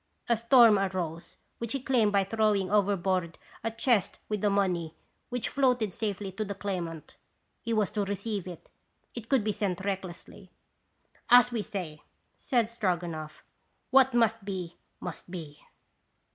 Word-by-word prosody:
A 235 - +4
storm 230 -2 +6
arose, 175 -4 -3 0.2
which 235 +1 -4
he 275 - -1
calmed 245 -5 +2
by 200 -1 +3
throwing 200 -2 +1
overboard 190 -4 +1 0.3
a 225 - 0
chest 230 -2 +1
with 210 -2 -2
the 210 - +3
money, 180 -5 0 0.3
which 245 -1 -2
floated 250 -7 +1
safely 200 -2 -3
to 195 +4 -3
the 200 -1 -5
claimant. 175 -5 -5 0.4
He 230 - -4
was 215 -3 +1
to 205 -2 -1
receive 200 -1 -3
it; 175 -2 -10 0.4
it 230 -2 -8
could 265 -6 +3
be 215 - +1
sent 190 -3 -2
recklessly." 190 0 -5 0.8
"As 245 0 +7
we 235 -2 -1
say," 180 -8 -6 0.3
said 240 -4 +1
Stroganoff, 175 -8 -3 0.5
"what 265 -1 +5
must 225 -2 +2
be, 185 -4 -5 0.2
must - - -7
be." 160 -5 -8
200 Hz, 145 wpm, -29 LUFS, 185-225 Hz, 0.8 s, As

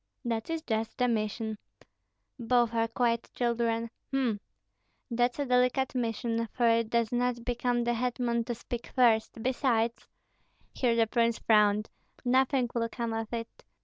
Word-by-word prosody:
"That 230 +1 -2
is 325 -1 -2
just 225 -4 -2
the 250 - +2
mission." 220 -1 -2 0.8
"Both 240 -1 +2
are 230 0 +1
quite 235 0 0
children. 230 -1 0 0.2
H'm! 255 -6 0 0.7
that's 245 +1 +1
a 285 - -1
delicate 250 +1 +2
mission, 230 -1 -1
for 240 -2 +2
it 230 -1 +3
does 235 -1 +1
not 245 -1 0
become 245 0 0
the 240 0 +1
hetman 240 0 0
to 240 -1 -3
speak 240 +1 -6
first. 225 -3 +3
Besides 240 -3 0 0.3
" - - -39
Here 240 -3 +1
the 230 -1 +4
prince 230 0 +1
frowned. 210 -1 +3 0.3
"Nothing 260 0 +3
will 230 -1 0
come 230 -1 -3
of 225 0 -3
it. 230 -1 -6
235 Hz, 150 wpm, -29 LUFS, 225-245 Hz, 0.8 s, the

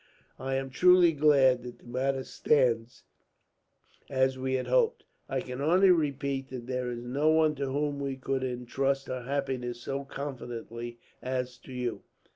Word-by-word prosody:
"I 135 0 -2
am 135 0 -2
truly 180 +2 +6
glad 140 -4 +4
that 125 0 -9
the - - -24
matter 130 +2 -1
stands 120 -6 +1 1.1
as 130 -1 +2
we 130 0 -1
had 130 - -1
hoped. 480 -1 +2 0.3
I 135 -1 -1
can 125 +1 -6
only 180 +6 +5
repeat 140 -4 0
that 125 -2 -7
there 125 0 -2
is 120 -1 -5
no 140 +5 +1
one 155 -1 +4
to 140 0 -2
whom 145 +1 -1
we 140 -1 -2
could 135 0 -2
intrust 135 +2 -1
her 130 0 -3
happiness 125 -2 -3
so 140 0 -3
confidently 120 -4 -6 0.2
as 125 -1 -2
to - - -13
you." 125 -2 -3
135 Hz, 160 wpm, -29 LUFS, 125-140 Hz, 1.1 s, truly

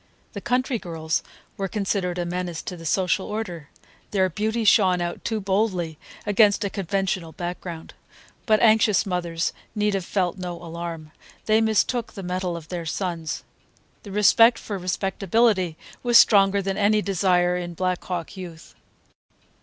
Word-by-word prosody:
The 200 - -6
country 250 +1 0
girls 160 -3 -2 0.4
were 195 - -2
considered 195 -3 -1
a 175 - -1
menace 175 -1 -4
to 180 - -5
the 165 -1 -7
social 190 +2 +1
order. 180 -9 -5 0.4
Their 190 -2 +2
beauty 220 +5 -1
shone 190 -4 +5
out 175 0 -4
too 220 -2 -1
boldly 190 -5 -1 0.3
against 205 0 +4
a 200 - -2
conventional 190 -3 -2
background. 175 -2 -6 0.5
But 215 -2 +4
anxious 220 -3 +4
mothers 175 -3 -2 0.2
need 210 -1 +1
have 195 -2 -1
felt 185 0 -1
no 180 -1 -4
alarm. 170 -2 -7 0.3
They 215 +1 +4
mistook 225 +2 +1
the 195 - -7
mettle 180 -1 -2
of 160 -1 -11
their 170 -2 -4
sons. 165 -3 -3 0.6
The 200 - -10
respect 225 +4 +5
for 200 -3 -5
respectability 190 0 +1 0.2
was 240 -1 +5
stronger 200 -2 +5
than 195 0 -2
any 210 0 +3
desire 180 -2 +2
in 175 -1 -4
Black 185 0 -1
Hawk 180 +1 -5
youth. 175 -4 -10
185 Hz, 150 wpm, -24 LUFS, 175-210 Hz, 0.6 s, shone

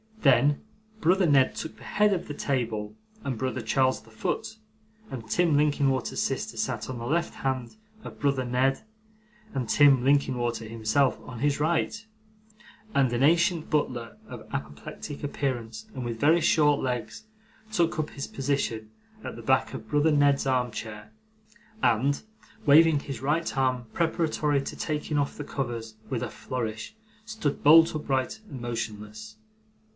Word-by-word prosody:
Then, 140 +1 +4 0.4
brother 185 +1 +3
Ned 140 -5 +4
took 160 - -6
the - - -14
head 210 -1 +2
of 180 -2 -3
the 145 - -5
table, 110 -7 -2 0.3
and 130 -4 -3
brother 130 +1 -2
Charles 130 +3 +1
the 110 - -19
foot; 110 - -3 0.5
and 115 -4 -6
Tim 170 0 +3
Linkinwater's 140 -3 +1
sister - - -2
sat - - -2
on 130 - -4
the 115 - -5
left 170 +6 0
hand 130 - -3 0.3
of - - -10
brother 140 -3 +1
Ned, 130 +2 +1 0.7
and 125 -3 -2
Tim 140 -2 +5
Linkinwater 125 -4 +1
himself 115 +5 +1
on 125 -2 -9
his 145 +2 +1
right: 170 +8 0 0.9
and 130 -3 +3
an 120 +2 +1
ancient 170 +2 +3
butler 125 -6 -1
of - - -9
apoplectic 75 - -6
appearance, 120 -6 -3
and 130 - -5
with 115 -1 -4
very 160 +4 +4
short 145 -3 +4
legs, 125 - -3 0.5
took 175 -4 +1
up 155 -1 -2
his 140 - -5
position 130 -6 -2 0.3
at - - -6
the - - -9
back - - +2
of - - -7
brother 150 +2 +3
Ned's 145 -2 +3
armchair, 110 -4 -2 0.7
and, 125 +5 +2 0.4
waving 155 0 +6
his 135 -4 -6
right 155 +5 0
arm 130 -2 +1
preparatory 155 -4 +1
to - - -6
taking 150 -1 -2
off 140 - -2
the 145 - -4
covers 120 -6 -4
with 125 -4 -2
a - - -3
flourish, 110 - -5 0.3
stood 220 -11 -3
bolt 165 +3 +7
upright 135 +2 -1
and 130 -4 -7
motionless. 115 - -6
135 Hz, 150 wpm, -27 LUFS, 120-150 Hz, 0.9 s, bolt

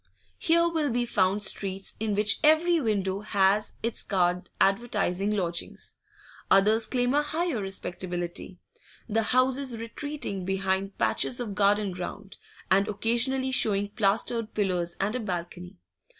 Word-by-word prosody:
Here 335 0 +3
will 320 -4 0
be 240 0 0
found 200 -2 +1
streets 195 0 -1
in 215 -2 -1
which 210 0 +2
every 320 +2 +4
window 200 -5 0
has 205 0 +1
its 230 0 0
card 180 -2 0
advertising 195 -2 +1
lodgings: 180 -5 -3 0.5
others 215 +3 +4
claim 245 0 +1
a 295 - +4
higher 310 -4 -2
respectability, 180 -2 -4 0.5
the 225 0 +1
houses 255 +2 +1
retreating 230 -3 -5
behind 190 +1 -1
patches 245 - 0
of 230 -5 -3
garden 205 0 +2
ground, 185 +2 -7 0.3
and 195 +2 +4
occasionally 245 +5 0
showing 205 -5 +1
plastered 215 +2 0
pillars 180 -4 0
and 205 +4 0
a - - -1
balcony. 180 -2 -5
205 Hz, 130 wpm, -27 LUFS, 190-245 Hz, 0.5 s, every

